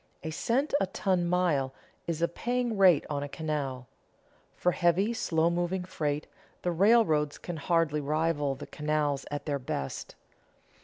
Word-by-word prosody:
A 160 Hz, -, -3 dB
cent 260 Hz, -, 0 dB
a -, -, +1 dB
ton 185 Hz, -2 st, 0 dB
mile 160 Hz, -7 st, +1 dB, 0.3 s
is 165 Hz, -1 st, -1 dB
a -, -, +4 dB
paying 240 Hz, +6 st, -1 dB
rate 185 Hz, -6 st, +5 dB
on 145 Hz, -1 st, -2 dB
a 145 Hz, -, -4 dB
canal. 140 Hz, -5 st, -3 dB, 0.7 s
For 180 Hz, -, +2 dB
heavy, 180 Hz, +6 st, +2 dB
slow 165 Hz, -6 st, +1 dB
moving 175 Hz, +2 st, -1 dB
freight, 150 Hz, -4 st, -2 dB, 0.4 s
the 180 Hz, -, +1 dB
railroads 170 Hz, -6 st, +3 dB
can 175 Hz, -2 st, -6 dB
hardly 160 Hz, -1 st, +1 dB
rival 150 Hz, -1 st, 0 dB
the -, -, -8 dB
canals 150 Hz, -2 st, -1 dB
at 145 Hz, 0 st, -4 dB
their 145 Hz, -2 st, -1 dB
best. 70 Hz, -, -4 dB
160 Hz, 150 wpm, -29 LUFS, 145-180 Hz, 0.7 s, rate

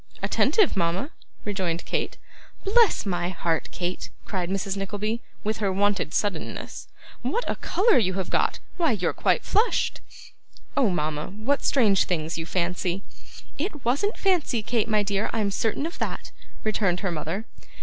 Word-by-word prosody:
'Attentive, 425 Hz, -7 st, +3 dB
mama!' 180 Hz, -, 0 dB, 0.3 s
rejoined 185 Hz, -5 st, -1 dB
Kate. -, -, -2 dB, 0.5 s
'Bless 440 Hz, -, +4 dB
my 175 Hz, -2 st, 0 dB
heart, 165 Hz, -2 st, -1 dB
Kate!' 180 Hz, 0 st, -3 dB, 0.2 s
cried 180 Hz, -4 st, -2 dB
Mrs. 195 Hz, 0 st, -1 dB
Nickleby, 210 Hz, +4 st, -2 dB, 0.2 s
with 215 Hz, +1 st, 0 dB
her 200 Hz, -3 st, +1 dB
wonted 195 Hz, -3 st, +1 dB
suddenness, 200 Hz, -4 st, -2 dB, 0.3 s
'what 480 Hz, -, -1 dB
a -, -, 0 dB
colour 420 Hz, -, +4 dB
you 185 Hz, -4 st, +1 dB
have 190 Hz, -1 st, -2 dB
got; -, -, +2 dB, 0.2 s
why, 325 Hz, -7 st, +3 dB
you're 180 Hz, -5 st, 0 dB
quite -, -, +2 dB
flushed!' 435 Hz, +4 st, +2 dB, 0.7 s
'Oh, 265 Hz, -6 st, +4 dB
mama! 155 Hz, -3 st, -1 dB
what 220 Hz, +9 st, -1 dB
strange 215 Hz, -8 st, +4 dB
things 160 Hz, -2 st, -1 dB
you 165 Hz, 0 st, -4 dB
fancy!' 180 Hz, +1 st, -1 dB, 0.6 s
'It 300 Hz, -, -3 dB
wasn't 285 Hz, -, +1 dB
fancy, 330 Hz, -, +2 dB
Kate, 230 Hz, -1 st, +1 dB
my 215 Hz, -1 st, +3 dB
dear, 200 Hz, +1 st, 0 dB
I'm 215 Hz, -3 st, +1 dB
certain 225 Hz, +8 st, 0 dB
of 335 Hz, -, -5 dB
that,' -, -, -3 dB, 0.3 s
returned 195 Hz, -4 st, +1 dB
her 195 Hz, -3 st, 0 dB
mother. 170 Hz, +6 st, -3 dB
200 Hz, 150 wpm, -26 LUFS, 180-240 Hz, 0.7 s, Bless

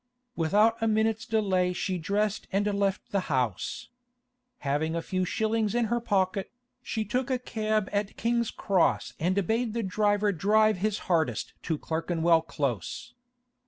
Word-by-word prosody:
Without 210 Hz, +8 st, +3 dB
a 225 Hz, -, +2 dB
minute's 220 Hz, 0 st, +1 dB
delay 190 Hz, -5 st, +1 dB
she 180 Hz, 0 st, -2 dB
dressed 205 Hz, +4 st, -1 dB
and 200 Hz, +2 st, +1 dB
left 200 Hz, -1 st, -1 dB
the 200 Hz, -, +2 dB
house. 125 Hz, -8 st, -1 dB, 0.8 s
Having 155 Hz, +4 st, 0 dB
a 170 Hz, -, -1 dB
few 185 Hz, +1 st, -1 dB
shillings 220 Hz, +2 st, 0 dB
in 240 Hz, -1 st, +2 dB
her 240 Hz, -, +2 dB
pocket, 195 Hz, -3 st, 0 dB, 0.3 s
she 220 Hz, -2 st, -3 dB
took 250 Hz, +6 st, -1 dB
a 260 Hz, -, +2 dB
cab 215 Hz, -4 st, -1 dB
at 205 Hz, 0 st, -2 dB
King's 235 Hz, 0 st, +1 dB
Cross 190 Hz, -4 st, +1 dB
and 185 Hz, +4 st, +1 dB
bade 225 Hz, +2 st, 0 dB
the 230 Hz, -, 0 dB
driver 205 Hz, +1 st, +2 dB
drive 215 Hz, +3 st, +3 dB
his 210 Hz, +2 st, 0 dB
hardest 165 Hz, -3 st, 0 dB
to 160 Hz, -3 st, -2 dB
Clerkenwell 165 Hz, +1 st, +1 dB
Close. 135 Hz, -, -3 dB
200 Hz, 150 wpm, -28 LUFS, 175-220 Hz, 0.8 s, Without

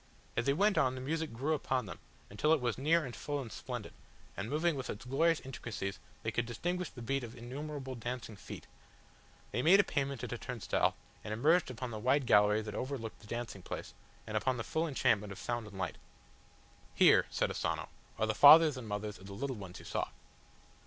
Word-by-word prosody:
As 115 Hz, -, 0 dB
they 140 Hz, -, +4 dB
went 195 Hz, +2 st, +3 dB
on 130 Hz, -4 st, +2 dB
the -, -, -5 dB
music 160 Hz, +4 st, -2 dB
grew 135 Hz, +7 st, -1 dB
upon 130 Hz, -4 st, 0 dB
them, 90 Hz, -, -8 dB, 0.3 s
until 150 Hz, +10 st, +3 dB
it 160 Hz, -, +3 dB
was 125 Hz, -1 st, 0 dB
near 155 Hz, +4 st, +2 dB
and 120 Hz, -, -7 dB
full 145 Hz, -1 st, -3 dB
and 120 Hz, -5 st, -6 dB
splendid, -, -, -6 dB, 0.4 s
and, 100 Hz, +3 st, -4 dB
moving 160 Hz, +3 st, +1 dB
with 130 Hz, -2 st, -5 dB
its 105 Hz, -, -6 dB
glorious 160 Hz, +6 st, +3 dB
intricacies 115 Hz, -7 st, -5 dB, 0.2 s
they -, -, -1 dB
could 120 Hz, -1 st, -1 dB
distinguish 175 Hz, +9 st, -2 dB
the 120 Hz, -, -10 dB
beat 135 Hz, +2 st, -1 dB
of 120 Hz, 0 st, -8 dB
innumerable 135 Hz, +3 st, -6 dB
dancing 120 Hz, -1 st, -5 dB
feet. -, -, -9 dB, 0.9 s
They 120 Hz, -, 0 dB
made 180 Hz, +8 st, +7 dB
a -, -, +7 dB
payment 140 Hz, -5 st, -2 dB
at -, -, -3 dB
a 120 Hz, -, -5 dB
turnstile, 125 Hz, -4 st, 0 dB, 0.3 s
and 105 Hz, -, -6 dB
emerged 155 Hz, +10 st, +3 dB
upon 125 Hz, 0 st, -5 dB
the 110 Hz, -, -5 dB
wide 130 Hz, +4 st, +2 dB
gallery 105 Hz, 0 st, +5 dB
that 105 Hz, -1 st, -6 dB
overlooked 130 Hz, -4 st, -4 dB
the 105 Hz, -, -15 dB
dancing 115 Hz, -4 st, -5 dB
place, -, -, -6 dB, 0.3 s
and 110 Hz, -, -5 dB
upon 130 Hz, +4 st, +1 dB
the 115 Hz, -, -2 dB
full 160 Hz, +7 st, -1 dB
enchantment 115 Hz, -8 st, +1 dB
of 100 Hz, -, -7 dB
sound 120 Hz, -2 st, -3 dB
and 100 Hz, -2 st, -10 dB
sight. 90 Hz, -4 st, -3 dB, 1.0 s
"Here," -, -, +6 dB
said -, -, 0 dB
Asano, -, -, -2 dB, 0.3 s
"are 110 Hz, -, +2 dB
the 110 Hz, -, 0 dB
fathers 150 Hz, +4 st, +9 dB
and 120 Hz, -3 st, -7 dB
mothers 105 Hz, 0 st, -4 dB
of 95 Hz, -, -12 dB
the 100 Hz, -, -8 dB
little 130 Hz, +5 st, -3 dB
ones 95 Hz, -4 st, -8 dB
you -, -, -12 dB
saw." -, -, -1 dB
125 Hz, 210 wpm, -33 LUFS, 110-145 Hz, 1.0 s, fathers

